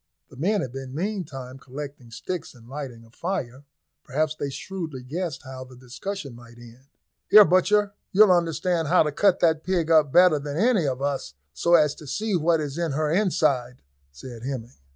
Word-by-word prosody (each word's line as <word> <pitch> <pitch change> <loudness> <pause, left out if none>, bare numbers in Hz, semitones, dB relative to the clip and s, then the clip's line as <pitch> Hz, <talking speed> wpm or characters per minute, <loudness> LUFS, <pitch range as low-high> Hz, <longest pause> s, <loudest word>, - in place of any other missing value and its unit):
The - - -13
men 195 +9 0
had 130 - -4
been 135 0 -7
meantime 150 -9 -5
collecting 135 -2 -9
sticks 170 +8 -6
and 115 -1 -17
lighting 130 -4 -7
a 115 - -21
fire: 140 -5 -4 0.4
perhaps 150 +3 -1
they 145 -2 -4
shrewdly 155 -2 -6
guessed 160 +3 -4
how 130 -1 -8
the 130 0 -14
discussion 130 +5 -7
might 120 0 -14
end. 120 +3 -15 0.4
"Here, 210 -1 +9
butcher, 200 +3 +3 0.2
you'll 205 0 +6
understand 170 -1 +1
how 180 +3 +5
to 150 - -2
cut 190 +5 +2
that 160 -2 +3
pig 175 -3 0
up 155 -4 +5
better 175 -3 +6
than 145 +1 -5
any 210 - +3
of 135 0 -2
us, 135 - -3 0.2
so 170 - +3
as 150 -3 +4
to 150 - -13
see 210 +8 -1
what 165 0 +2
is 150 +1 -4
in 165 -4 -1
her 150 +1 0
inside," 155 - +1 0.3
said 115 - -10
Hemming. 125 -1 -6
150 Hz, 185 wpm, -25 LUFS, 130-175 Hz, 0.4 s, Here